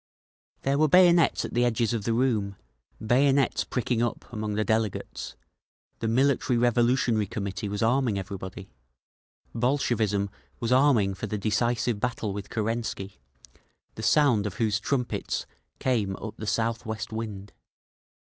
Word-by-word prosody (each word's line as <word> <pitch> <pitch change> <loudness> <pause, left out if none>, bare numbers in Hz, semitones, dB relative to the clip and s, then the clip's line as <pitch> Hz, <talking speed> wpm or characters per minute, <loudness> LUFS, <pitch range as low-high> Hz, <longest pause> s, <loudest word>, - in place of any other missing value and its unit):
There 140 +1 +1
were 155 - +5
bayonets 175 +1 +5
at - - -7
the 120 - +2
edges 120 -1 +1
of 110 -3 -2
the 115 - +1
room, 110 -6 0 0.5
bayonets 135 +3 +3
pricking 120 -1 -1
up 120 - -2
among 105 -2 -3
the 110 - +1
delegates; 110 -2 -2 0.6
the 115 - -2
Military 130 +1 +2
Revolutionary 120 -2 +2
Committee 100 +1 -4
was 105 +2 -2
arming 120 -2 +2
everybody, 95 -2 -7 0.8
Bolshevism 115 -5 0 0.3
was 115 0 -2
arming 125 -7 +4
for - - -5
the 105 - -3
decisive 115 +1 0
battle 110 -3 -2
with 100 0 -6
Kerensky, 110 -4 -3 0.7
the - - -8
sound 115 -3 +3
of 100 - -6
whose 110 -1 +1
trumpets 125 0 -2 0.3
came 110 -7 0
up 110 +2 -7
the 110 - -7
south 115 +1 0
west 110 -1 -5
wind…. 105 -3 -6
115 Hz, 140 wpm, -27 LUFS, 105-125 Hz, 0.8 s, were